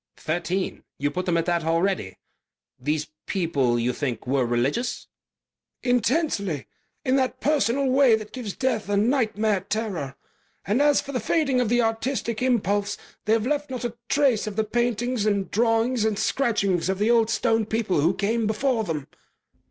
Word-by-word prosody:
"Thirteen. 175 +4 -2
You 145 +1 -1
put 185 +1 -3
them 170 -1 +2
at 165 - 0
that 175 -2 0
already?... 165 - 0 0.6
These 150 +3 -2 0.2
people, 140 -10 +1
you 120 +1 0
think, 125 -5 -3
were 130 -1 +1
religious?" 135 - -1 0.8
"Intensely. 245 - 0 0.4
In 260 0 +3
that 260 -1 0
personal 280 -2 +1
way 260 -2 +5
that 215 -1 -7
gives 235 -6 -6
death 230 -6 -1
a 205 - +2
nightmare 220 -3 +2
terror. 190 -10 -3 0.5
And 215 +8 +1
as 290 -1 +4
for 280 - -8
the 255 - -1
fading 270 +1 +1
of 240 - 0
the 240 0 +3
artistic 225 0 -1
impulse, 205 -5 +1 0.3
they've 220 +1 +2
left 290 +1 -1
not 255 -1 -4
a 235 -1 -4
trace 270 -7 +2
of 210 - -4
the 220 - +1
paintings 240 0 0
and 200 -3 0
drawings 225 +2 +2
and 220 -2 +1
scratchings 200 -10 +1
of 190 - 0
the 210 +4 +2
Old 230 -2 +4
Stone 225 -3 +1
people 220 -8 0
who 170 +5 +2
came 220 +2 0
before 225 +2 +1
them." 155 -7 -3
220 Hz, 165 wpm, -25 LUFS, 180-245 Hz, 0.8 s, way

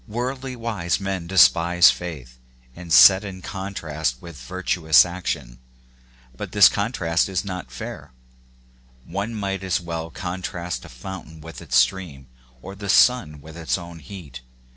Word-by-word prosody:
Worldly 130 +3 -4
wise 110 -7 -2
men 95 -3 -4
despise 90 -2 +5
faith, 65 -8 -8 0.4
and 90 -1 -10
set 95 +7 +8
it - - -6
in 95 -1 -9
contrast 80 -10 -4
with 85 +1 -11
virtuous 90 +1 +3
action; 70 -9 -5 0.8
but - - -7
this 105 -2 +8
contrast 95 -6 -1
is 95 +1 -2
not 95 -1 -6
fair: - - -8 0.9
one 100 - -4
might 100 -2 -3
as 95 -1 0
well 85 -2 -5
contrast 90 0 -5
a - - -12
fountain 80 +4 -9
with 80 +2 -10
its 75 -7 -4
stream, 80 -9 +1 0.4
or 95 - -8
the 100 0 -8
sun 90 - +3
with 80 +2 -12
its 85 +1 -2
own 85 -2 -10
heat. 75 -5 -10
90 Hz, 145 wpm, -23 LUFS, 80-95 Hz, 0.9 s, set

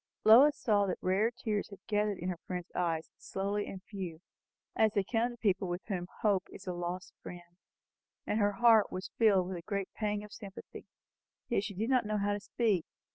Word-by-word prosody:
Lois 260 +7 +8
saw 205 -4 +2
that 185 - -1
rare 195 +5 +3
tears 230 -4 -3
had 200 - -10
gathered 210 -1 0
in 180 - -3
her 175 -2 -4
friend's 180 -2 -5
eyes, 165 -2 -1
slowly 200 +2 -2
and 190 -1 -8
few, 185 -6 -6 0.6
as 220 -1 +3
they 200 -3 +2
come 230 +4 0
to 240 - -9
people 195 -4 +1
with 175 +1 -3
whom 180 -4 -3 0.2
hope 200 -3 +2
is 195 - -11
a 180 - -3
lost 175 +1 -5
friend; 175 -1 -10 0.7
and 215 - 0
her 205 -1 +3
heart 225 -1 +5
was 185 +1 -5
filled 200 -5 +4
with 185 -1 -4
a - - -7
great 200 +1 -4
pang 210 -1 -2
of 210 - -11
sympathy. 200 -3 -10 0.6
Yet 215 -4 +1
she 200 -2 -6
did 220 +7 -1
not 250 -4 +3
know 215 0 0
how 205 0 +1
to 205 - -2
speak. 205 -4 0
200 Hz, 205 wpm, -32 LUFS, 185-215 Hz, 0.7 s, Lois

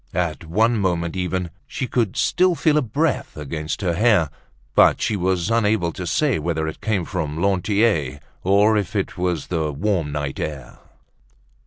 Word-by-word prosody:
At 85 -2 -1
one 110 +7 +2
moment 85 -3 -1
even, 90 -1 -2 0.2
she 130 - -3
could 115 -6 -1
still 180 -1 +3
feel 150 0 +2
a - - +1
breath 145 - -1
against 75 +3 -4
her 90 -3 0
hair, 95 -6 +3 0.4
but - - +5
she 110 - 0
was 95 +1 0
unable 105 -6 +2
to 90 - -5
say 140 - +1
whether 80 0 -1
it 80 - -6
came 100 -6 0
from 80 -4 -3
Lantier 100 - +1 0.2
or 100 +3 +4
if 105 0 -2
it 100 - -1
was 90 -4 -1
the 80 -4 -1
warm 80 0 -1
night 70 -2 -3
air. 75 -4 -6
90 Hz, 165 wpm, -22 LUFS, 80-105 Hz, 0.4 s, but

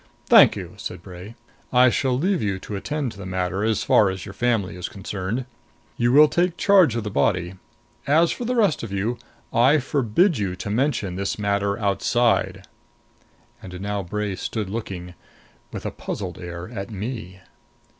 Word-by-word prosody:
"Thank - - +7
you," - - -7
said 90 -1 -7
Bray. 95 +4 -10 0.4
"I 125 0 +5
shall 130 -1 +1
leave 185 +6 +1
you 100 -3 -1
to 100 +2 -7
attend 145 +5 -3
to - - -14
the 100 - -7
matter, 95 +1 -2
as 110 -1 +1
far 105 - +4
as 95 -1 -5
your 95 - -8
family 110 -6 0
is 90 -1 -5
concerned. 100 +4 -4 0.5
You 120 0 +2
will 150 +3 +8
take 175 +2 0
charge 190 - +5
of 115 - -2
the 105 - -4
body. 90 +4 +1 0.5
As 160 +4 +4
for - - -4
the 250 +2 -1
rest 205 -9 +2
of 115 - -6
you, 110 +5 -2 0.3
I 130 +6 +5
forbid 140 - +1
you 95 -3 -2
to 100 +2 -5
mention 110 -7 0
this 100 0 -2
matter 100 -1 0
outside." 115 +3 +1 1.0
And 90 -1 -9
now 100 +1 -2
Bray 105 +2 -3
stood 105 0 -4
looking, 95 -5 -5 0.6
with - - -7
a - - -2
puzzled - - -6
air, 85 0 -7
at 100 -5 -6
me. 105 -3 -6
105 Hz, 175 wpm, -23 LUFS, 95-125 Hz, 1.0 s, will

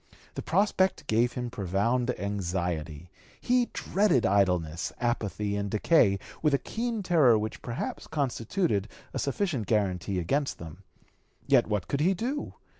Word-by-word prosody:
The - - -4
prospect 190 -2 +1
gave 120 0 +2
him 125 -2 -4
profound 115 +6 0
anxiety; 90 -4 -3 0.3
he 250 -1 +2
dreaded 190 - +1
idleness, 90 -5 +1
apathy, 105 -4 -1
and 100 0 -2
decay 105 - +3 0.2
with 150 -3 +3
a - - +3
keen 230 - -3
terror 155 -11 +5
which 110 0 -4
perhaps 120 0 -5
constituted 135 - -1 0.3
a - - -2
sufficient 140 - -1
guaranty 100 -3 0
against 135 - -1
them. 80 -2 -10 0.6
Yet - - +4
what 105 -3 -1
could 140 - -1
he 185 +6 +3
do? 260 +10 -3
115 Hz, 135 wpm, -28 LUFS, 95-155 Hz, 0.6 s, terror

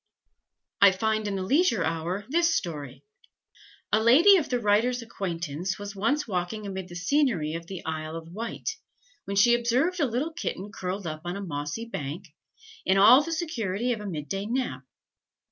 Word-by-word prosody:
I 200 -1 +8
find 215 +2 0
in 200 - -2
the 190 - -2
Leisure 260 - +2
Hour 165 +5 -2
this 330 +3 +2
story: 145 -6 -4 0.9
"A 215 - +4
lady 300 - +7
of 320 - -2
the 245 - 0
writer's 235 +3 +2
acquaintance 175 -4 -4
was 205 0 -7
once 260 +10 0
walking 200 +2 -3
amid 190 -2 -5
the 175 - -9
scenery 180 - +1
of 165 0 -6
the 190 -2 -7
Isle 155 0 -4
of 165 0 -8
Wight, 230 +4 -6 0.6
when 200 - -4
she 235 +4 +6
observed 250 +10 +1
a 290 - +3
little 260 +8 -2
kitten 205 - -4
curled 190 -2 -4
up 155 -1 -5
on 175 +1 -4
a - - -5
mossy 150 +7 -4
bank, 170 -3 -6 0.5
in 190 +1 +2
all 245 +8 +8
the 330 - -5
security 245 - -1
of 215 - -6
a 210 - -6
mid 150 -6 -5
day 195 +6 -3
nap. 235 - -2
200 Hz, 180 wpm, -27 LUFS, 175-240 Hz, 0.9 s, I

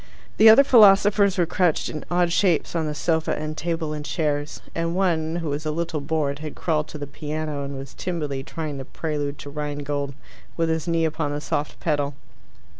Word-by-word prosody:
The 220 - +9
other 225 +6 +9
philosophers 205 -4 +6
were 175 - +3
crouched 175 -1 +1
in 155 - -5
odd 175 -1 +2
shapes 175 -3 +2
on 160 -2 0
the 150 - -3
sofa 160 +1 0
and 155 0 -4
table 165 -1 -2
and 150 -1 -5
chairs, 150 -1 -2
and 165 +1 -1
one, 165 -4 +1
who 165 -3 -2
was 145 +2 -2
a 155 - -2
little 160 -1 -2
bored, 140 -1 -1
had 155 -1 -7
crawled 155 -2 0
to - - -8
the 145 - -5
piano 150 0 -4
and 140 0 -5
was 135 -1 -8
timidly 150 -7 -3
trying 150 -1 -5
the 135 - -6
Prelude 145 -1 -3
to 145 - -9
Rhinegold 145 -1 -3 0.4
with 165 0 +1
his 160 -1 -1
knee 165 -1 +2
upon 155 -2 -2
the 145 - -2
soft 150 0 -3
pedal. 145 -3 -1
155 Hz, 195 wpm, -24 LUFS, 145-170 Hz, 0.4 s, The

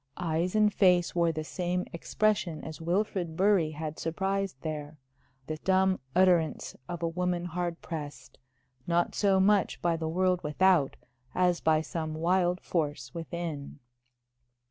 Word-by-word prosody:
Eyes 175 +2 -1
and 210 -1 +4
face 180 -3 +3
wore 170 -1 +2
the 155 -1 -4
same 180 +2 -2
expression 175 -2 0
as 160 0 -8
Wilfrid 175 -1 -1
Bury 190 -4 +3
had 155 0 -6
surprised 190 -1 -2
there 155 -1 -5 0.5
the 155 +2 -4
dumb 190 +2 +2 0.2
utterance 180 -3 +2
of 175 -1 -5
a - - +2
woman 175 +1 -1
hard 175 0 -3
pressed, 145 -6 -7 0.5
not 170 0 +1
so 195 -2 +3
much 200 0 +3
by 170 -1 +1
the 160 -1 -3
world 180 +1 +1
without 160 -1 +3 0.4
as 180 -1 +2
by 155 -1 +3
some 160 -1 -4
wild 175 +2 +1
force 145 -7 -2
within. 165 -4 -5
170 Hz, 140 wpm, -29 LUFS, 160-185 Hz, 0.5 s, and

